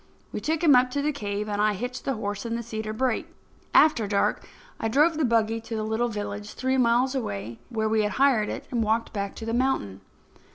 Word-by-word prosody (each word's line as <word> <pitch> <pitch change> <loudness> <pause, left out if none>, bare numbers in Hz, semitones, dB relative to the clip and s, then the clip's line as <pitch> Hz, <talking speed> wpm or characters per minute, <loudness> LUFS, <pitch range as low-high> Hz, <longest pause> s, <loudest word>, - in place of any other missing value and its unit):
We - - -4
took 320 +1 -1
him 305 -4 +7
up 250 0 +4
to 280 +3 -2
the 300 - +1
cave 210 -6 -3
and 205 0 -1
I 210 0 +3
hitched 245 +5 -5
the 270 - 0
horse 205 -2 -4
in 230 -1 -3
the 235 - -3
cedar 220 -1 -4
brake. 255 +6 -1 0.4
After 245 -9 +5
dark 200 -1 +1 0.4
I 225 - -1
drove 300 +8 +3
the 310 - 0
buggy 225 -2 +2
to 230 0 -6
the 215 - -2
little 220 +2 0
village, 205 -1 -5
three 260 +1 0
miles 245 +2 +3
away, 115 - -4
where 220 -3 -1
we 220 0 +2
had 210 0 -1
hired 260 -6 +3
it, - - -5
and 240 -2 0
walked 220 +2 0
back 200 -2 -3
to 225 - -7
the 225 - -2
mountain. 235 - 0
225 Hz, 230 wpm, -26 LUFS, 210-255 Hz, 0.4 s, him